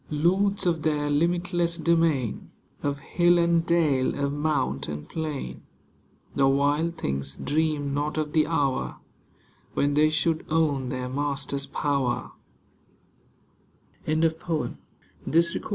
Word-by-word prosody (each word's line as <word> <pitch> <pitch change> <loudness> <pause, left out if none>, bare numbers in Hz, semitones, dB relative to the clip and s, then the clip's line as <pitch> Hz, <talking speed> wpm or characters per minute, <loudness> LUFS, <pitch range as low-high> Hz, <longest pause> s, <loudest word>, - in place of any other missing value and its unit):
Lords 190 +6 +1
of 165 -3 +1
their 150 -1 0
limitless 170 +2 +1
domain. 165 - +1 0.3
Of 145 0 -1
hill 175 +2 +3
and 170 -1 +3
dale, 155 -6 +2
of 140 0 -1
mount 145 - -1
and 75 0 -6
plain. 155 -4 -4 0.7
The 135 -1 +4
wild 145 +5 +1
things 70 0 -2
dreamed 150 -2 0
not 150 +2 -1
of 150 -1 -2
the 155 -2 +3
hour 145 -5 0 0.8
When 145 0 +2
they 150 +1 +4
should 160 +1 0
own 150 -5 +1
their 130 -1 -3
Master's 140 +1 -2
power 140 -4 -1
150 Hz, 105 wpm, -26 LUFS, 140-165 Hz, 0.8 s, The